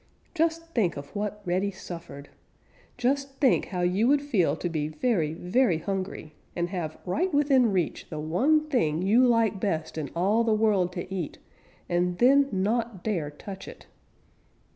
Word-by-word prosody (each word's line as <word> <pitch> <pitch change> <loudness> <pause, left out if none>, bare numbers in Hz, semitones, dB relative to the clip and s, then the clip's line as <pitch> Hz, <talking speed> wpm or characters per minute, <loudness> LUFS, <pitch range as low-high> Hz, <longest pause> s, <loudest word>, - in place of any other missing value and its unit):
Just 330 0 -1
think 185 - +1
of 140 +6 -9
what 210 0 -3
Reddy 185 +3 0
suffered. 170 -6 -9 0.7
Just 275 +2 0
think 270 -4 +3
how 180 -3 -4
you 185 +6 +2
would 285 +1 +3
feel 185 - +1
to 175 - -3
be 155 -3 -2
very, 160 -2 0
very 185 +1 +2
hungry 190 -3 -4 0.2
and 175 0 -1
have 170 -5 -4
right 335 - 0
within 275 -6 +3
reach 180 -4 -2
the 155 - -5
one 270 - +2
thing 175 - +1
you 220 +6 +4
like 230 -4 +2
best 160 -5 -2
in 145 -3 -4
all 200 +7 +2
the 225 -2 +2
world 205 -5 +2
to 180 +1 -5
eat 175 -5 -4 0.5
and 175 0 0
then 275 +4 +5
not 210 +1 -1
dare 175 -9 -1
touch 190 +6 -9
it. - - -11
195 Hz, 165 wpm, -27 LUFS, 175-245 Hz, 0.7 s, then